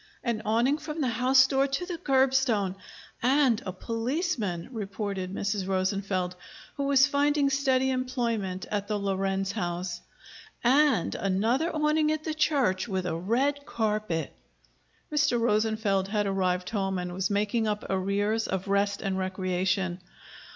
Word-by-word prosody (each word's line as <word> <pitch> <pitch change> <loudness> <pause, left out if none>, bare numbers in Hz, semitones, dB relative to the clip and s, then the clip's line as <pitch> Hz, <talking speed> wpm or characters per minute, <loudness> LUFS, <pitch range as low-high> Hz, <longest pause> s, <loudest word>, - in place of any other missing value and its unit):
"An 235 -3 -1
awning 235 +7 +2
from 310 0 -6
the 265 -4 +1
house 255 +3 +5
door 270 +1 +2
to 275 +6 -2
the 350 -2 -5
curbstone, 265 -8 +2 0.5
and 255 -2 +3
a - - -1
policeman!" 230 - -2
reported 200 -4 -4
Mrs. 200 -1 -2
Rosenfeld, 190 -1 -1 0.4
who 280 - -2
was 275 -1 +5
finding 285 0 +2
steady 265 -1 +2
employment 235 -7 -2
at 205 -1 -1
the 210 -1 -1
Lorenz 195 -1 -1
house. 175 -3 -3 0.6
"And 260 - +3
another 225 - +1
awning 305 -1 +2
at 310 0 -2
the 315 - -2
church, 270 -11 +1
with 190 -3 -2
a 170 -2 -1
red 260 - 0
carpet!" 215 -7 -1 0.8
Mr. 290 -5 +2
Rosenfeld 215 -3 +1
had 205 0 0
arrived 185 -2 0
home 195 -3 -1
and 180 0 -4
was 190 +1 -1
making 210 +2 0
up 210 0 -2
arrears 200 +3 0
of 190 +1 -3
rest 200 0 +1
and 190 -1 -1
recreation. 185 -1 -1
215 Hz, 140 wpm, -28 LUFS, 190-265 Hz, 0.8 s, house